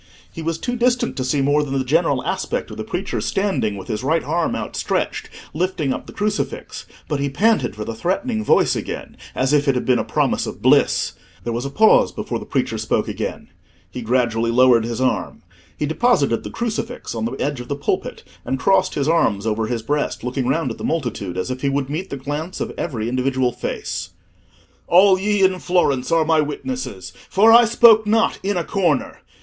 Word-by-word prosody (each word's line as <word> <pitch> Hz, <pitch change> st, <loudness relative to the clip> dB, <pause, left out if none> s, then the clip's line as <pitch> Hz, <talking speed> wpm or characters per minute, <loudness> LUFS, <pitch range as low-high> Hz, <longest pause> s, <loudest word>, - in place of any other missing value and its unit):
He 165 Hz, -, -6 dB
was 165 Hz, 0 st, -2 dB
too 245 Hz, +7 st, -3 dB
distant 245 Hz, 0 st, +1 dB
to 130 Hz, -, -1 dB
see 135 Hz, +2 st, 0 dB
more 145 Hz, +2 st, +3 dB
than 135 Hz, -1 st, -2 dB
the 130 Hz, -, 0 dB
general 145 Hz, -2 st, +1 dB
aspect -, -, -2 dB
of -, -, -8 dB
the -, -, -4 dB
preacher -, -, -3 dB
standing, 135 Hz, -, -1 dB
with 95 Hz, -, -9 dB
his 105 Hz, +2 st, -3 dB
right 160 Hz, +4 st, +1 dB
arm 165 Hz, +3 st, -1 dB
outstretched, -, -, -2 dB, 0.2 s
lifting 165 Hz, -4 st, -1 dB
up -, -, -7 dB
the -, -, -9 dB
crucifix; 210 Hz, 0 st, -3 dB, 0.2 s
but 145 Hz, -3 st, -2 dB
he 140 Hz, 0 st, 0 dB
panted 215 Hz, -, +1 dB
for 105 Hz, 0 st, -5 dB
the 115 Hz, -, -4 dB
threatening 215 Hz, -, -1 dB
voice -, -, +3 dB
again -, -, -6 dB, 0.2 s
as 130 Hz, +2 st, +1 dB
if 145 Hz, 0 st, +3 dB
it 135 Hz, -, +3 dB
had 125 Hz, -, -1 dB
been 125 Hz, -2 st, +3 dB
a -, -, 0 dB
promise -, -, 0 dB
of -, -, -7 dB
bliss. -, -, +3 dB, 0.3 s
There 120 Hz, -, -3 dB
was 120 Hz, +3 st, -3 dB
a -, -, -2 dB
pause 215 Hz, +9 st, +4 dB
before -, -, -4 dB
the -, -, -10 dB
preacher -, -, -1 dB
spoke -, -, 0 dB
again. -, -, -5 dB, 0.4 s
He 125 Hz, -, -6 dB
gradually 115 Hz, -1 st, +1 dB
lowered 120 Hz, -1 st, +5 dB
his 115 Hz, -1 st, -4 dB
arm. 130 Hz, 0 st, -1 dB, 0.3 s
He 150 Hz, -, -1 dB
deposited 155 Hz, -, +1 dB
the -, -, -6 dB
crucifix 235 Hz, +1 st, -4 dB
on 110 Hz, -1 st, -3 dB
the 115 Hz, -, -3 dB
edge 140 Hz, 0 st, -2 dB
of 120 Hz, -, -10 dB
the 140 Hz, -, -2 dB
pulpit, 145 Hz, -, -3 dB, 0.2 s
and 135 Hz, -, -2 dB
crossed 185 Hz, +7 st, +2 dB
his 140 Hz, -1 st, 0 dB
arms 115 Hz, -11 st, +2 dB
over 110 Hz, 0 st, 0 dB
his 115 Hz, -2 st, -3 dB
breast, 145 Hz, +1 st, -2 dB
looking 125 Hz, +1 st, -2 dB
round 160 Hz, +5 st, 0 dB
at -, -, -8 dB
the -, -, -7 dB
multitude 110 Hz, -, -2 dB
as 95 Hz, +7 st, -2 dB
if 130 Hz, 0 st, -5 dB
he 140 Hz, -, +1 dB
would 140 Hz, 0 st, -2 dB
meet 170 Hz, +6 st, -4 dB
the 140 Hz, -, -5 dB
glance 145 Hz, +6 st, -5 dB
of -, -, -3 dB
every 115 Hz, -9 st, -3 dB
individual 130 Hz, 0 st, 0 dB
face. 85 Hz, -5 st, -4 dB, 0.8 s
"All 185 Hz, +1 st, +6 dB
ye 205 Hz, 0 st, +1 dB
in 185 Hz, -1 st, +3 dB
Florence 160 Hz, -9 st, +1 dB
are 165 Hz, -1 st, +3 dB
my 160 Hz, -1 st, +3 dB
witnesses, 150 Hz, -, -5 dB, 0.2 s
for 215 Hz, +4 st, +5 dB
I 240 Hz, +1 st, +8 dB
spoke 225 Hz, -1 st, +6 dB
not 225 Hz, +1 st, +2 dB
in 200 Hz, -1 st, -1 dB
a 175 Hz, -, 0 dB
corner. 175 Hz, -9 st, 0 dB
145 Hz, 210 wpm, -20 LUFS, 125-185 Hz, 0.8 s, I